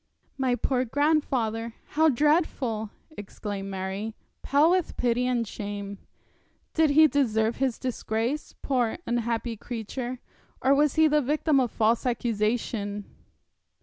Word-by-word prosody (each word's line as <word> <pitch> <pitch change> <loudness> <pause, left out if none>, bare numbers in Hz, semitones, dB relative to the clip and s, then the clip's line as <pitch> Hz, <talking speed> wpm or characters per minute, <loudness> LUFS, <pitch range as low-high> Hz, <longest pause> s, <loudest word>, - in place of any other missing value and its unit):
'My 260 -2 +1
poor 255 0 0
grandfather! 250 -5 0
How 315 +1 +4
dreadful!' 270 -6 +1 0.2
exclaimed 205 -4 -6
Mary, 195 +3 -4 0.3
pale 295 +4 +4
with 365 -2 0
pity 245 +1 +1
and 240 -3 0
shame. 200 -1 -6 0.7
'Did 320 -1 +4
he 310 +2 +7
deserve 230 -6 +1
his 265 -3 0
disgrace, 245 +2 -2
poor 245 -5 +1
unhappy 235 0 -1
creature 240 +3 -5 0.4
or 265 +1 +4
was 290 0 +3
he 315 0 +6
the 300 0 +3
victim 295 +1 +2
of 250 -2 +1
false 225 +3 +2
accusation?' 215 -3 -1
245 Hz, 120 wpm, -27 LUFS, 220-285 Hz, 0.7 s, he